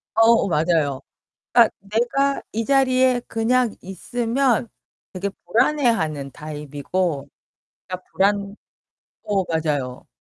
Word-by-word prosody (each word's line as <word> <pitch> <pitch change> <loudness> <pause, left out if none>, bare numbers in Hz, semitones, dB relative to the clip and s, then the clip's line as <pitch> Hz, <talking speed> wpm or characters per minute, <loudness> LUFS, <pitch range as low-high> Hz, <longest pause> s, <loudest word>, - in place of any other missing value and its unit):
어어 225 -1 +5
맞아요. 155 -5 +1 0.5
그니까 235 -2 +6
내가 240 +7 0
이 225 +1 -1
자리에 255 -2 +3
그냥 230 +1 +1
있으면 235 +5 0 0.4
되게 190 +2 -3 0.2
불안해하는 220 - +1
타입이고 150 +1 -3 0.6
그니까 185 -1 -6
불안 200 +1 +1 0.7
어 195 -3 0
맞아요. 150 -6 -2
200 Hz, 230 characters per minute, -22 LUFS, 155-240 Hz, 0.7 s, 그니까